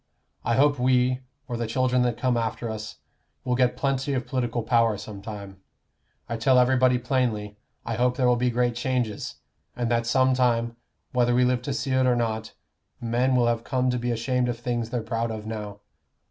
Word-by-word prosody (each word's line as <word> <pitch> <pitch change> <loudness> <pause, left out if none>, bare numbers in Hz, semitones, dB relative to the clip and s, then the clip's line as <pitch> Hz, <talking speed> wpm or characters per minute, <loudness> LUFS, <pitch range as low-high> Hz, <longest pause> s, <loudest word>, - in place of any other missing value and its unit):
I 115 - +1
hope 145 0 +3
we, 125 0 +3 0.3
or 120 -3 -3
the 115 -1 -2
children 125 +2 +1
that 120 -2 0
come 130 -2 +1
after 115 0 -2
us, 110 0 -6 0.5
will 125 - 0
get 125 0 +2
plenty 135 0 0
of 125 -2 -1
political 120 -3 -2
power 115 -2 +3
some 105 -1 -8
time. 100 -2 -8 0.7
I 115 - -3
tell 130 +3 +4
everybody 125 0 +4
plainly, 115 -5 -1 0.3
I 115 - -2
hope 125 +1 +1
there 130 - +2
will 125 0 +5
be 125 +1 +1
great 120 0 +1
changes, 125 -3 -2 0.4
and 120 -1 -1
that 115 0 +1
some 130 +1 +3
time, 120 -2 +1 0.4
whether 120 -1 +2
we 125 0 +4
live 125 -1 +1
to 140 - -4
see 135 -1 -2
it 130 0 +3
or 125 - +4
not, 110 -2 -2 0.5
men 120 +3 +1
will 125 -1 +4
have 115 -1 0
come 130 +1 0
to 125 - -1
be 120 +1 -2
ashamed 125 +2 0
of 120 - -2
things 120 -1 -2
they're 120 -2 -2
proud 115 +1 -2
of 110 -1 -5
now. 105 -2 -6
120 Hz, 200 wpm, -25 LUFS, 115-125 Hz, 0.7 s, will